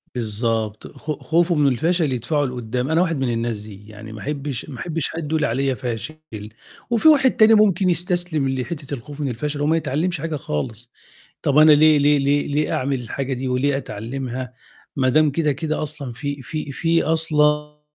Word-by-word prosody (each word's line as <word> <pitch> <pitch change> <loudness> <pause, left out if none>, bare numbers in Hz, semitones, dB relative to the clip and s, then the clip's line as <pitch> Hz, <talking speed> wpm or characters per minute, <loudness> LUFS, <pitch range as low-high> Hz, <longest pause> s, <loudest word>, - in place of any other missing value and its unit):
بالضبط، 110 -1 -1
خ 155 - -5
خوفه 165 +4 +1
من 145 -2 +3
الفشل 160 +4 +1
يدفعه 145 +5 0
لقُدّام، 125 0 -3
أنا 165 +2 +3
واحد 165 -4 0
من 130 -2 0
الناس 115 -1 -2
دي، 105 -1 -12
يعني 110 0 -10
ما 110 - -8
أحبّش 145 -1 -4
ما 130 -5 -8
أحبّش 165 -4 -2
حد 160 -2 -5
يقول 155 -1 +1
عليَّ 135 +2 0
فاشل 120 +6 -5 0.7
وفي 235 +5 +3
واحد 275 -4 +6
تاني 220 0 +5
ممكن 195 -4 +4
يستسلم 175 -4 +1
لحتّة 140 +2 -4
الخوف 140 +3 -8
من 145 - -1
الفَشَل، 145 +5 -3
وما 155 +3 +2
يتعلِّمش 160 +2 -1
حاجة 165 -1 -3
خالص، 110 - -4 0.5
طَب 145 0 +1
أنا 155 0 +8
ليه 155 +1 +6
ليه 145 +1 +4
ليه 140 +1 +1
ليه 145 +1 0
أعمل 135 0 -1
الحاجة 135 +3 -4
دي 130 +1 -4
وليه 135 +2 +1
أتعلِّمها 125 +1 -5 0.4
ما 130 -2 +2
دام 155 +3 +4
كده، 150 +1 +1
كده 155 +3 -2
أصلًا 145 -4 -5
في 140 +3 -5
في 150 +1 -5
في 165 +4 +1
أصلًا 150 -2 +1
145 Hz, 180 wpm, -21 LUFS, 125-155 Hz, 0.7 s, أنا